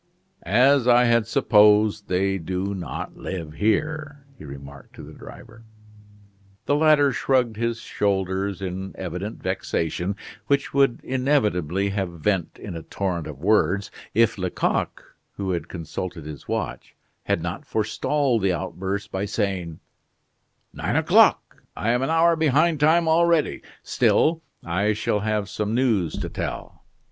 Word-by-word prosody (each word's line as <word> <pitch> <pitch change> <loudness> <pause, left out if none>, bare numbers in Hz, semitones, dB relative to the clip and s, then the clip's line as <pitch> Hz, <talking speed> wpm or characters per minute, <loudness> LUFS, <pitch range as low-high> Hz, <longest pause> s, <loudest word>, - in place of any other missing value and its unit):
"As 125 +7 +3
I 120 0 +6
had 115 -2 +3
supposed, 105 -2 +4
they 95 +1 0
do 95 +4 -3
not 95 -3 -6
live 85 -5 -6
here," 145 - -1
he 120 - -13
remarked 70 -1 -11
to - - -10
the - - -11
driver. 115 0 -13 1.0
The 145 - +1
latter 150 -2 +4
shrugged 125 -2 +1
his 115 +1 -2
shoulders 95 -1 -1
in 95 +1 -5
evident 95 +4 -5
vexation, 90 +4 -2 0.3
which 140 0 0
would 135 -3 +2
inevitably 105 - 0
have 95 -2 -2
vent 95 0 -1
in - - -8
a 80 - -5
torrent 90 -2 -3
of 75 - -8
words, 100 +3 +1 0.2
if 115 -2 +3
Lecoq, 90 -1 -1 0.3
who 95 -2 -3
had 85 -2 -3
consulted 85 -1 -6
his 75 -2 -9
watch, - - -4 0.3
had 80 - 0
not 95 - -5
forestalled 115 +3 0
the 95 -1 +2
outburst 95 +3 -4
by 95 +1 -2
saying: 95 -6 -3 0.9
"Nine - - -2
o'clock - - +3 0.2
I 115 - 0
am 120 +1 +1
an 135 - -1
hour 165 +1 +4
behind 160 +1 +2
time 160 +3 +4
already: 165 0 +2 0.2
still 165 +1 +2 0.2
I 100 +5 +1
shall 105 0 -1
have 105 -1 -1
some 105 +3 -3
news 110 -10 +1
to - - -4
tell. - - -6
105 Hz, 140 wpm, -23 LUFS, 95-130 Hz, 1.0 s, I